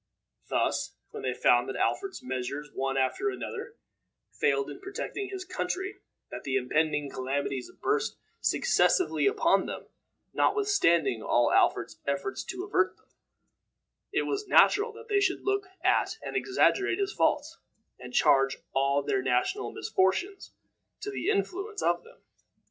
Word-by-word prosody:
Thus, - - 0 0.2
when - - -7
they 130 -1 -2
found 120 0 +3
that 135 - -4
Alfred's 390 -1 -1
measures, 130 +3 -4
one 135 0 -1
after 135 - +1
another, 445 +3 -6 0.6
failed 140 -1 +1
in - - -9
protecting 395 0 -5
his 380 -1 -6
country, 380 +2 -3 0.3
that - - -6
the 135 -1 -2
impending 150 +3 +1
calamities 135 -1 -3
burst 440 +1 0 0.2
successively 405 -5 +2
upon 405 - +3
them, - - -6 0.5
notwithstanding 170 - +2
all 120 +2 +2
Alfred's - - +2
efforts 140 -1 -2
to 370 0 -5
avert 185 - +1
them, - - -32 1.0
it - - +1
was 410 0 -2
natural 420 +4 +5
that 455 +1 -12
they 410 -3 +2
should 380 -2 0
look 400 0 0 0.2
at - - +2
and - - -6
exaggerate 390 -1 +2
his 400 0 -1
faults, 305 +3 0 0.4
and 125 0 -9
charge 135 +1 +4 0.2
all 140 +1 +2
their 395 - 0
national 385 +3 0
misfortunes 375 - 0 0.5
to 410 0 -4
the 400 -1 -2
influence 400 0 -1
of - - +1
them. 470 +2 -19
370 Hz, 140 wpm, -29 LUFS, -, 1.0 s, natural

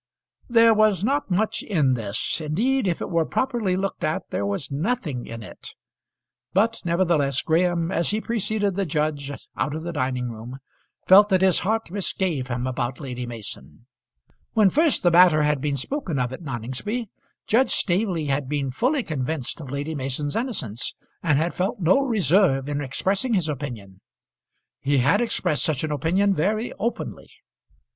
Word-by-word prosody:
There 230 -1 +6
was 215 -4 +3
not 280 +3 0
much 200 +4 0
in 150 -10 +1
this. 110 +5 -2
Indeed 220 - +1
if 170 - -1
it - - -4
were 165 -1 +2
properly 230 -1 0
looked 195 +1 -3
at 155 0 -2
there 100 - -1
was 100 +8 -3
nothing 155 - -2
in 115 -1 -7
it. - - -10 0.8
But 225 +4 +2
nevertheless 170 -6 +1
Graham, 170 +1 +1
as 170 -2 +1
he 215 - +1
preceded 215 -3 -1
the 195 -2 -1
judge 150 -2 -1 0.3
out 145 - -1
of 160 - -5
the 170 0 -4
dining 130 -4 -1
room, 115 +4 -8 0.5
felt 205 +2 +7
that 190 -1 +3
his 190 -2 +5
heart 220 -1 -1
misgave 185 -8 -1
him 125 0 -2
about 125 -1 -2
Lady 125 -3 -5
Mason. 105 - -9 0.7
When 210 -4 +4
first 310 -1 +2
the 175 - +4
matter 170 -3 +6
had 150 -2 +1
been 145 -1 -1
spoken 185 - -3
of 125 0 -1
at 130 - -8
Noningsby, 140 - -4 0.4
Judge 240 +3 +3
Staveley 180 -4 0
had 140 -1 -1
been 140 -3 -1
fully 255 - +1
convinced 155 - -3
of 140 - -8
Lady 140 +3 -3
Mason's 145 +1 -3
innocence, 190 - -3 0.3
and 150 -5 +2
had 165 +3 0
felt 190 +2 -2
no 185 +7 +4
reserve 190 - +2
in 145 0 -2
expressing 195 - 0
his 180 -5 +1
opinion. 120 -10 -6 0.8
He 140 +1 +1
had 135 - +3
expressed 185 -10 0
such 155 -3 +1
an 155 - -2
opinion 180 +8 +2
very 215 +8 -1
openly. 235 +2 -4
160 Hz, 165 wpm, -24 LUFS, 135-200 Hz, 0.8 s, felt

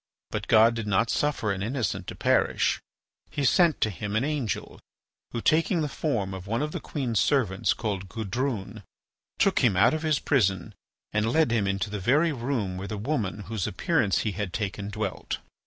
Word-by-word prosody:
But - - -3
God 115 +1 +6
did 115 -2 -4
not 105 +3 +2
suffer 145 -8 0
an 95 -1 -3
innocent 120 +3 -2
to - - -6
perish. - - +2 0.5
He 145 - -2
sent 170 0 +4
to 110 - +2
him 100 +3 -4
an 110 - +2
angel, 145 -6 -3 0.5
who, 115 - -4
taking 165 - +2
the 150 - 0
form 115 -10 -2
of 95 0 -7
one 115 +6 0
of 150 - -2
the - - -4
queen's 120 -7 -2
servants 110 -10 +2
called 100 -4 -3
Gudrune, 110 -1 -3 0.6
took - - +3
him 105 -7 +3
out 115 +6 +5
of 155 - -1
his 155 -2 +2
prison 95 - +1 0.4
and 105 +2 +1
led 160 -4 +3
him 110 -4 +1
into 100 +1 -1
the 105 - -3
very 145 - +3
room 120 -8 -2
where 95 +2 -5
the 105 - -4
woman 105 -4 -2
whose 105 -2 -3
appearance 110 - +1
he 110 - -1
had 95 -1 -4
taken 100 -1 -3
dwelt. 105 +1 -3
110 Hz, 190 wpm, -27 LUFS, 100-140 Hz, 0.6 s, God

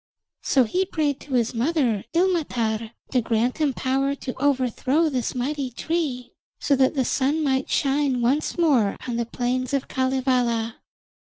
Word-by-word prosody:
So 265 - +3
he 360 +12 0
prayed 305 -7 -1
to 275 -3 -5
his 235 -1 +1
mother 245 -4 +1
Ilmatar 240 - 0 0.2
to 255 - +2
grant 230 +4 0
him 300 -3 +2
power 270 +2 0
to 260 -2 -6
overthrow 280 +3 +1
this 255 -4 -2
mighty 270 +2 -2
tree, 250 -2 -3 0.3
so 280 - +2
that 265 +2 +2
the 265 -2 +1
sun 285 +6 +1
might 265 -2 0
shine 275 -2 +1
once 265 +9 0
more 270 - +3
on 240 -2 -2
the 235 -1 -1
plains 255 +3 -1
of 270 - -2
Kalevala. 250 -3 0
260 Hz, 155 wpm, -24 LUFS, 245-285 Hz, 0.3 s, So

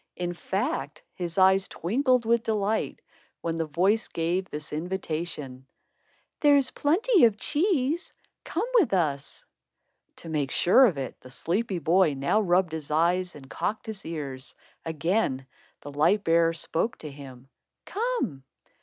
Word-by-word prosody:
In 175 -1 -3
fact, 170 -6 -3
his 175 -1 -5
eyes 190 0 +5
twinkled 250 - +1
with 235 0 +3
delight, 215 -1 -1 0.4
when 165 -1 -2
the 165 -1 -2
voice 190 +8 +2
gave 175 +3 -1
this 150 0 -7
invitation: 155 -6 -4 0.7
"There's 285 -3 +4
plenty 370 - +3
of 220 -3 +2
cheese. 315 - 0 0.3
Come 365 +7 -2
with 295 - +2
us." 145 -6 -2 0.7
To - - -11
make 150 -4 -1
sure 250 - +5
of 175 -10 -2
it, 135 -2 -6
the 130 - -13
sleepy 185 - -1
boy 170 -1 +3
now 140 +11 +1
rubbed 180 -3 +2
his 160 -3 -5
eyes 175 +4 +1
and 135 -2 -12
cocked 215 +9 -3
his 220 -3 -6
ears. 140 -5 -5 0.3
Again, 160 -3 -1 0.4
the 145 - -8
light 165 +9 +2
bearer 165 0 +3
spoke 170 +8 -2
to 150 - -8
him: 135 -2 -12 0.4
"Come." 445 - -2
175 Hz, 140 wpm, -27 LUFS, 150-220 Hz, 0.7 s, eyes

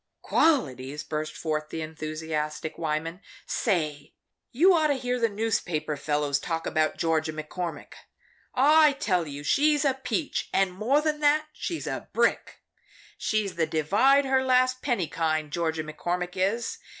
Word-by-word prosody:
"Qualities!" 145 - +1
burst 155 0 -4
forth 155 -1 -2
the 160 - -4
enthusiastic 155 0 -4
Wyman. 165 +3 -2 0.2
"Say 155 - -1 0.4
you 310 +10 +5
just 345 - +4
ought 310 - +3
to 290 - +2
hear 250 -1 -2
the 230 -1 +2
newspaper 185 -8 -1
fellows 145 -1 0
talk 165 +2 -3
about 155 -1 0
Georgia 160 -1 0
McCormick! 160 +2 -6 0.6
I 300 +2 +6
tell 180 - 0
you 145 0 -7
she's 295 - +3
a 275 - +3
peach, 265 +4 -3
and 195 -1 +2
more 240 +10 +2
than 305 -1 -1
that, 305 +1 +2
she's 335 +1 -4
a - - -5
brick. - - 0 0.5
She's 215 -4 -1
the 160 -2 +1
divide 210 - +3
her 265 0 +2
last 255 0 +2
penny 235 - 0
kind 155 -2 -1
Georgia 160 -1 -1
McCormick 175 +3 -3
is. 200 +5 -1
180 Hz, 150 wpm, -27 LUFS, 155-260 Hz, 0.6 s, I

